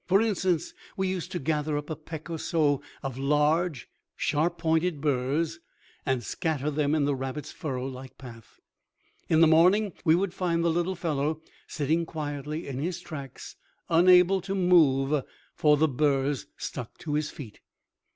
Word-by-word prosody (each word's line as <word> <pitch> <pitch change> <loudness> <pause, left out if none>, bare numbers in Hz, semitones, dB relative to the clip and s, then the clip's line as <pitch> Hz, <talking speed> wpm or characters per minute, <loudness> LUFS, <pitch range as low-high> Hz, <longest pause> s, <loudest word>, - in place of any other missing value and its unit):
For 190 +2 +5
instance, 190 -6 0 0.2
we 190 0 0
used 185 -2 -4
to - - -2
gather 150 -1 -1
up 145 +1 -5
a - - -2
peck 155 0 -9
or 165 -1 -4
so 150 -5 +1 0.2
of 135 -1 -4
large, 150 +2 +1 0.3
sharp 160 +4 0
pointed 160 -1 +1
burrs 145 +4 0 0.5
and 130 -3 0
scatter 150 +2 -2
them 145 0 +1
in 150 -2 +2
the 145 - +1
rabbit's 135 +2 -5
furrow 130 -4 -4
like 130 0 -8
path. 115 -4 -13 0.7
In 160 0 +4
the 165 - +8
morning, 180 +5 +4
we 160 -1 +5
would 185 0 -1
find 170 -3 0
the 170 - +3
little 175 +2 0
fellow 155 -2 -1 0.3
sitting 160 +3 0
quietly 150 0 -5
in 135 -2 -4
his 175 +4 -2
tracks, 145 -7 -9 0.3
unable 180 +2 +5
to 195 +2 -3
move, 150 -6 +4 0.3
for 150 -1 +4
the 160 +2 +3
burrs 140 -1 0
stuck 120 -2 -6
to 150 - -5
his 150 0 0
feet. 120 -8 -10
155 Hz, 160 wpm, -27 LUFS, 140-170 Hz, 0.7 s, the